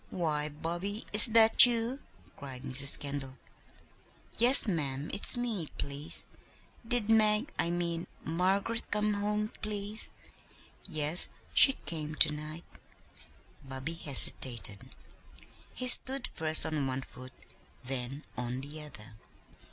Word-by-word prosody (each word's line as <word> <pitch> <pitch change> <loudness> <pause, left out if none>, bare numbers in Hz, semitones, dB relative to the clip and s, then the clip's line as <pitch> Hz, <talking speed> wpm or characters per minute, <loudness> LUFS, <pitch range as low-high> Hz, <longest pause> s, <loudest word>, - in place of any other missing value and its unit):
"Why, 150 -4 -3
Bobby, 175 +8 -6
is 210 +4 +9
that 225 0 +6
you?" 240 +2 -3 0.4
cried 130 -2 -11
Mrs. 135 +1 +3
Kendall. 140 -2 -8 1.0
"Yes, 250 +4 +6
ma'am, 145 - -5
it's 210 - +4
me, 225 -9 -4
please. 140 +2 -3 0.6
Did 240 -3 +4
Mag 220 +4 +1
I 170 - 0
mean 170 0 -4 0.2
Margaret 195 +7 -3
come 210 0 -2
home, 210 +1 -4
please?" 210 0 -5 0.8
"Yes, 155 -1 +1 0.3
she 270 - +5
came 155 -2 -7
to 150 0 +3
night." 155 +2 -10 1.0
Bobby 135 +4 -6
hesitated. 120 - +3 0.8
He 255 - -5
stood 260 +1 +3
first 155 -1 +4
on 155 -4 -4
one 130 0 -5
foot, 130 0 -15 0.5
then 130 +2 -6
on 125 +1 -7
the 145 +3 -9
other. 110 -8 -13
160 Hz, 115 wpm, -28 LUFS, 140-210 Hz, 1.0 s, is